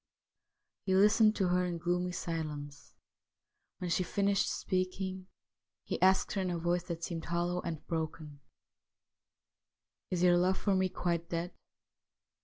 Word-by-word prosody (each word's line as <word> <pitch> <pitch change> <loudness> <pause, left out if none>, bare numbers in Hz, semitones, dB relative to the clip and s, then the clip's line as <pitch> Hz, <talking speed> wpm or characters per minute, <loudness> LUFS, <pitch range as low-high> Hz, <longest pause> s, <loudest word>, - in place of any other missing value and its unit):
He 190 - +3
listened 215 +2 +5
to 190 -3 +1
her 180 +1 +2
in 175 -1 -2
gloomy 180 +1 -1
silence. 150 -4 -5 0.8
When 180 -1 -4
she 185 - +2
finished 200 +2 +1
speaking 185 0 -2 0.6
he - - -4
asked 190 +1 +4
her 195 - -1
in 185 - -1
a 175 - -1
voice 175 +1 0
that 170 -1 -5
seemed 165 -1 -4
hollow 175 +1 -1
and 160 -3 -5
broken: 155 -3 -4 0.9
' 105 +1 -61
Is 180 -1 0
your 175 -1 +6
love 185 +2 +2
for 200 - +1
me 185 0 +2
quite 170 -1 -2
dead 170 +1 -3
175 Hz, 145 wpm, -32 LUFS, 165-185 Hz, 0.9 s, your